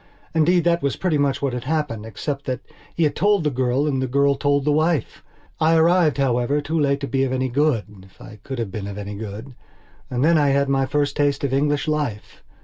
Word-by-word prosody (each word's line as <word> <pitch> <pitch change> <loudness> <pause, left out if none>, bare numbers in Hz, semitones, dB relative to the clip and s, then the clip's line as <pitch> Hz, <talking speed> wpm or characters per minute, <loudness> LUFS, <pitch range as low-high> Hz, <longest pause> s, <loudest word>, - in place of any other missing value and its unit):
Indeed, 165 +2 +3
that 170 0 +2
was 140 -1 -1
pretty 170 -6 0
much 140 -1 0
what 135 -3 0
had 125 0 -5
happened, 140 -8 -2
except 140 +6 -5
that 130 -1 -3 0.3
he 170 - +1
had 150 -2 +1
told 205 -2 +2
the 150 - +1
girl 130 +2 0
and 135 -3 0
the 130 - -1
girl 140 +2 +2
told 140 0 0
the 150 - +3
wife. 155 -3 0 0.4
I 160 +1 +3
arrived, 165 -1 +3
however, 130 +1 +1
too 155 +3 -2
late 140 -1 +1
to 140 - -3
be 135 -1 0
of 135 - -1
any 130 0 -1
good 140 -3 +1 0.2
if - - -28
I 105 - -12
could 135 +4 -6
have 115 -5 -3
been 100 0 -5
of 100 0 -7
any 105 0 -6
good. 110 +5 -7 0.6
And 125 +2 0
then 165 -1 +4
I 145 - +3
had 140 0 +2
my 135 -1 +1
first 145 -1 0
taste 145 -1 0
of 135 -2 -1
English 145 +1 +1
life. 145 -9 -3
140 Hz, 235 wpm, -22 LUFS, 130-150 Hz, 0.6 s, then